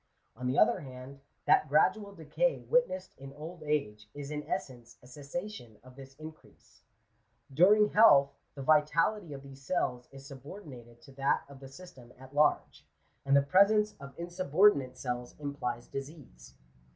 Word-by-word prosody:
On 125 +2 -5
the 130 - -1
other - - +4
hand, 130 -1 -11 0.3
that 150 - +3
gradual 200 +7 +2
decay 195 - -1
witnessed 485 - 0
in 135 0 -10
old 160 +4 -10
age, 105 -9 -3
is 145 0 -7
in 150 0 -3
essence 120 -5 -5
a - - -16
cessation 140 - -8
of 130 0 -16
this 135 0 -13
increase. 155 +1 -14 0.7
During 205 +7 +5
health, 140 -10 +6 0.2
the 140 - -7
vitality 155 +5 +2
of 140 -1 -8
these 135 -1 -13
cells 125 -5 -2
is 135 0 -13
subordinated 135 - -12
to - - -15
that 135 +1 0
of 140 -1 -14
the 135 - -11
system 135 -6 -14
at 130 +1 -15
large; 150 +1 +1 0.4
and 140 0 +3
the 140 - +4
presence 210 +7 +3
of 140 -1 -12
insubordinate 175 -4 +2
cells 125 -1 -5
implies 140 -5 -4
disease. 135 - -10
140 Hz, 150 wpm, -30 LUFS, 130-170 Hz, 0.7 s, health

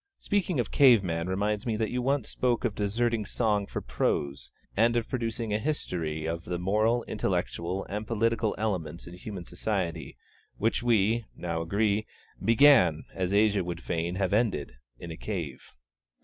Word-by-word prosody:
Speaking 190 -7 0
of 120 - -1
cave 125 -8 +6
man 85 -1 -2
reminds 105 +4 -1
me 110 -2 0
that 110 -1 -1
you 125 - -1
once 135 -1 0
spoke 125 -1 0
of 115 - 0
deserting 110 +2 0
song 105 -1 0
for - - -4
prose, 70 -1 -1 0.3
and 115 +3 +3
of 120 -1 0
producing 115 -3 -2
a 105 - +1
history 85 - -2
of 85 +1 -3
the 90 - -2
moral, 110 +6 +2
intellectual, 90 +3 -2
and 105 +2 -4
political 115 -1 +1
elements 90 -7 -2
in 85 - -10
human 90 0 -7
society, 90 -3 -3 0.4
which, 115 +2 +1
we 115 -1 +2
now 85 -2 -3
agree, 100 +5 +1 0.4
began, 115 - +6
as 95 -1 -2
Asia 105 -1 +3
would 85 0 -5
fain 85 +1 -2
have 95 0 0
ended, 105 - +1 0.2
in 85 +4 -8
a 80 - -7
cave. 85 -11 -5
105 Hz, 165 wpm, -28 LUFS, 90-115 Hz, 0.4 s, cave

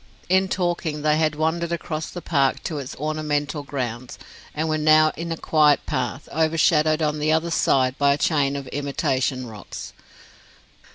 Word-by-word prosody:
In 190 +1 +3
talking 170 -5 -2
they 155 0 +3
had 155 -1 +1
wandered 160 +2 -1
across 160 -2 -3
the 175 - -8
park 140 -5 +1
to 155 -3 -3
its 135 -2 -7
ornamental 150 0 -2
grounds, 125 -3 -5 0.4
and 155 +1 -1
were 155 0 0
now 155 0 +5
in 170 +1 -5
a 165 - -2
quiet 150 -3 +3
path, 130 +1 -3
overshadowed 160 -1 +2
on 150 0 0
the 155 +1 +1
other 160 +2 +1
side 130 -5 +2
by 140 -1 +4
a - - -7
chain 140 -2 +1
of 140 -1 -5
imitation 135 -2 -1
rocks. 110 -3 -9
150 Hz, 165 wpm, -23 LUFS, 140-160 Hz, 0.4 s, now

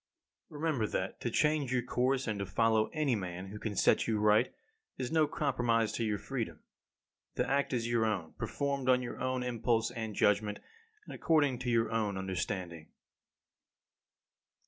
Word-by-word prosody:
16. - - -14
Remember 150 -9 0
that 95 -2 -3
to 120 - -1
change 150 0 +1
your 125 -1 +1
course, 130 +2 0
and 105 -2 -2
to 100 - -2
follow 110 +3 +2
any 150 -6 +1
man 90 -1 -5
who 105 +1 -8
can 105 -2 -4
set - - +3
you 110 -2 +1
right 105 +3 +4 0.5
is 125 -2 -3
no 160 -2 +4
compromise 115 -7 +1
of 115 - 0
your 105 -1 0
freedom. 120 +1 -4 0.8
The - - 0
act 140 +2 +1
is 120 -3 -1
your 120 -1 +2
own, 95 -7 -2
performed 140 -2 -2
on 125 0 +4
your 120 - -6
own 130 0 -1
impulse 115 -1 0
and 110 -3 -5
judgment, 105 +1 +2 0.5
and - - -9
according 145 -6 +2
to 130 -1 -3
your 115 -1 +2
own 105 -3 0
understanding. 90 -3 -4
115 Hz, 170 wpm, -32 LUFS, 105-130 Hz, 0.8 s, right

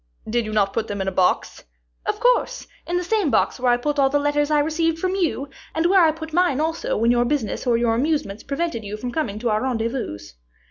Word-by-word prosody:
"Did 235 +1 0
you 215 - -5
not 200 -2 +1
put 225 -1 -1
them 205 -1 -4
in 190 - -2
a - - +1
box?" 185 -1 0 0.4
"Of - - -1
course; - - +1 0.2
in 350 - 0
the 360 - -1
same 405 -3 +1
box - - +1
where 250 0 +3
I 240 - +3
put 290 +4 -2
all 270 -1 +4
the 290 - +2
letters 290 0 +1
I 305 - +3
received 320 +2 +1
from 370 +2 -1
you, 330 -7 -1 0.3
and 320 +1 +1
where 375 0 +5
I 320 - +5
put 320 0 -6
mine 350 -5 +2
also 320 +2 -1
when 230 +2 +3
your 240 0 +3
business 255 -2 -2
or 235 -1 +4
your 235 -1 +2
amusements 250 -5 -1
prevented 285 -4 -3
you 205 +1 -5
from 245 +3 -5
coming 235 -7 -2
to 230 +1 -1
our 215 0 +1
rendezvous." 230 - -2
275 Hz, 240 wpm, -22 LUFS, 230-320 Hz, 0.4 s, where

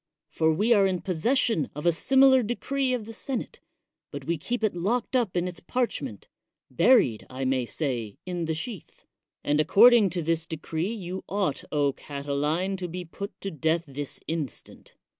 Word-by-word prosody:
For 160 0 +2
we 210 +9 +3
are 200 -3 +5
in 185 -2 -1
possession 190 - +1
of 150 - -6
a 170 - +6
similar 265 +8 +5
decree 255 +4 -1
of 245 -4 -2
the 225 - -9
senate, 260 +3 -4 0.5
but - - -7
we 170 - 0
keep 220 +9 -3
it 215 - +2
locked 225 +9 -1
up 230 -8 +1
in 175 +1 0
its 175 -2 -6
parchment 160 - -3 0.3
— 130 - -30
^buried, 170 - +4
I 130 +1 -4
may 130 -2 0
say, 120 -8 -3
in 175 -2 -3
the 160 0 -1
sheath; 205 - -8 0.4
and 150 +1 +2
according 215 +5 +6
to 175 -1 -3
this 165 0 0
decree 160 +4 -3
you 190 -4 -5
ought, 195 -8 -1 0.3
Catiline, 150 +6 -2
to 180 -1 -4
be 180 +1 -6
put 200 +5 -8
to 195 - -4
death 160 +2 0
this 140 -1 -6
instant. 155 -6 -6
175 Hz, 175 wpm, -27 LUFS, 155-220 Hz, 0.5 s, a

